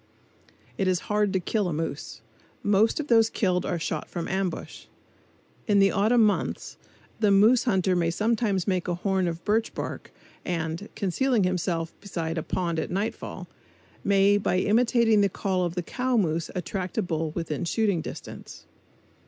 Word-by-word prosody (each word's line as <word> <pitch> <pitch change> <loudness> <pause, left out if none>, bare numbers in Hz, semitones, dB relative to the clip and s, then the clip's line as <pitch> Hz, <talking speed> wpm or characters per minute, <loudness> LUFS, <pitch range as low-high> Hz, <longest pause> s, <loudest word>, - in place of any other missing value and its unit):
It 195 - +1
is 185 -1 +1
hard 210 -1 +2
to 190 - +2
kill 205 +2 -1
a 175 - -2
moose. 150 -7 -4 0.4
Most 205 +5 +3
of 305 - -2
those 225 -4 +4
killed 180 -5 0
are 175 - -1
shot 160 -1 -3
from 170 -2 -4
ambush. 190 -1 -3 0.8
In 205 -2 +3
the 195 0 +5
autumn 220 +3 +3
months 210 -1 -1 0.4
the 215 -2 +3
moose 215 +6 +5
hunter 190 -5 +2
may 170 -1 +1
sometimes 210 0 0
make 185 -2 0
a 175 - 0
horn 190 0 0
of 170 0 -5
birch 220 +2 +1
bark - - -5 0.3
and, 165 +2 -3
concealing 220 +4 +1
himself 175 -2 -1
beside 165 -5 -3
a - - -2
pond 170 0 -2
at - - -3
nightfall, 200 +5 -4 0.6
may 200 +1 +4
by 185 -2 0
imitating 225 +1 +3
the 200 - +3
call 185 -1 -1
of 175 0 -4
the 180 - -2
cow 250 +6 -1
moose 165 -5 0
attract 185 +2 -4
a 220 - +2
bull 160 -2 -2
within 165 -2 -3
shooting 200 -1 +1
distance. - - -9
190 Hz, 165 wpm, -26 LUFS, 175-210 Hz, 0.8 s, the